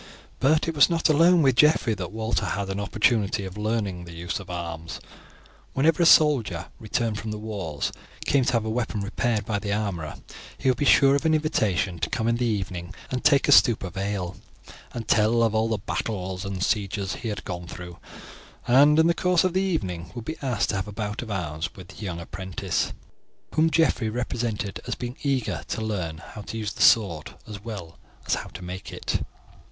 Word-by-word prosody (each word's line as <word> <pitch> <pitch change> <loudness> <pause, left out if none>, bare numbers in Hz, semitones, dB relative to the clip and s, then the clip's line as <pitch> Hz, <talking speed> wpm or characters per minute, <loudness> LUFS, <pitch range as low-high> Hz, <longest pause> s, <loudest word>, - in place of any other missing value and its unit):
But 150 +5 +3
it 165 - -1
was 145 +1 +6
not 165 -1 +2
alone 165 +2 +5
with 135 -3 +4
Geoffrey 150 -6 +4
that 95 -4 -5
Walter 110 +1 -1
had 100 -1 -2
an 95 - -3
opportunity 105 -1 +1
of 95 0 -7
learning 105 -4 -2
the 85 -1 -10
use 85 +3 -3
of 100 -1 -11
arms. 85 -2 -5 0.7
Whenever 155 +5 +3
a 170 - +6
soldier, 115 - +4
returned 110 0 -1
from 110 - -5
the 105 - -3
wars, 100 -9 -3 0.3
came 140 -1 +3
to 130 - +1
have 115 -2 +1
a - - -2
weapon 110 -3 -2
repaired 110 +2 -1
by 105 -2 -1
the 100 -1 -4
armourer, 100 -7 -2 0.4
he - - -3
would 125 - +1
be 145 - +1
sure 135 0 +6
of 140 - 0
an 160 -1 +3
invitation 100 - 0
to - - -1
come 120 -4 -1
in 115 - +3
in 120 - -2
the 125 - +1
evening 95 -4 -3 0.2
and 125 -1 -2
take 140 -2 +4
a - - +4
stoup 120 -6 +6
of 90 -3 -6
ale, 95 -2 -3 0.5
and 115 -3 -6
tell 115 +2 +4
of 110 0 +2
the 110 - 0
battles 95 -2 -3
and 95 -2 -3
sieges 100 -2 -1
he 115 - -6
had 105 - -4
gone 90 -2 -5
through, 90 0 -9 0.7
and 145 +5 +6
in 160 - +6
the 170 - +4
course 180 0 +2
of 185 -2 +1
the 190 - +2
evening 95 - -2
would 120 -2 -6
be 160 - -3
asked 130 -5 0
to - - 0
have 95 - -3
a - - -6
bout 105 +1 -4
of 120 - -7
arms 80 -6 -3
with 95 -1 -11
the 110 - -10
young 90 -4 -4
apprentice, 95 +2 -3 0.6
whom 160 +1 +4
Geoffrey 130 -9 +2
represented 115 -3 -3
as - - -1
being 125 0 -5
eager 135 -4 -1
to - - -3
learn 90 -8 -3
how 95 +5 -10
to 115 - -6
use 105 -2 -3
the - - -7
sword 85 -9 +4
as 105 -2 -8
well 100 -8 -7 0.3
as - - 0
how - - -2
to 95 - -10
make 90 +1 -7
it. - - -2
110 Hz, 210 wpm, -25 LUFS, 95-125 Hz, 0.7 s, was